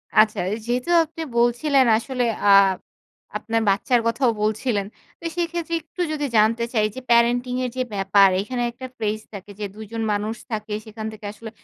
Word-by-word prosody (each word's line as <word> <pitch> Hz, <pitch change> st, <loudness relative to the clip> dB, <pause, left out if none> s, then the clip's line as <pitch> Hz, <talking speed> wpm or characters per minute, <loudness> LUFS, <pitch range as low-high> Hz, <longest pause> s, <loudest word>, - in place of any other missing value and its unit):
আচ্ছা 215 Hz, 0 st, +4 dB, 0.3 s
যেহেতু 245 Hz, +5 st, -2 dB, 0.2 s
আপনি 325 Hz, +1 st, -9 dB, 0.2 s
বলছিলেন 250 Hz, +3 st, +3 dB
আসলে 250 Hz, +1 st, -2 dB, 0.2 s
আ -, -, +6 dB, 0.9 s
আপনার 225 Hz, -1 st, -1 dB
বাচ্চার 235 Hz, +5 st, +2 dB
কথাও 235 Hz, +1 st, +2 dB
বলছিলেন। 215 Hz, -1 st, 0 dB, 0.3 s
তো -, -, -12 dB
সেইক্ষেত্রে 335 Hz, -1 st, -2 dB
একটু 345 Hz, +4 st, -8 dB
যদি 295 Hz, -1 st, -2 dB
জানতে 225 Hz, +2 st, +3 dB
চাই 215 Hz, -2 st, +3 dB
যে 260 Hz, -, -5 dB
parenting 245 Hz, +2 st, +3 dB
এর -, -, -2 dB
যে 255 Hz, -, +1 dB
ব্যাপার 195 Hz, 0 st, +5 dB
এখানে 245 Hz, +3 st, -4 dB
একটা 255 Hz, +2 st, -9 dB
phrase 215 Hz, -1 st, -2 dB
থাকে 200 Hz, 0 st, -9 dB
যে 210 Hz, -, -2 dB
দুইজন 220 Hz, +1 st, -6 dB
মানুষ 210 Hz, +2 st, -2 dB, 0.2 s
থাকে 215 Hz, -1 st, -4 dB
সেখান 220 Hz, 0 st, -8 dB
থেকে 215 Hz, -1 st, -11 dB
আসলে 220 Hz, +1 st, -9 dB
230 Hz, 165 wpm, -23 LUFS, 215-255 Hz, 0.9 s, আ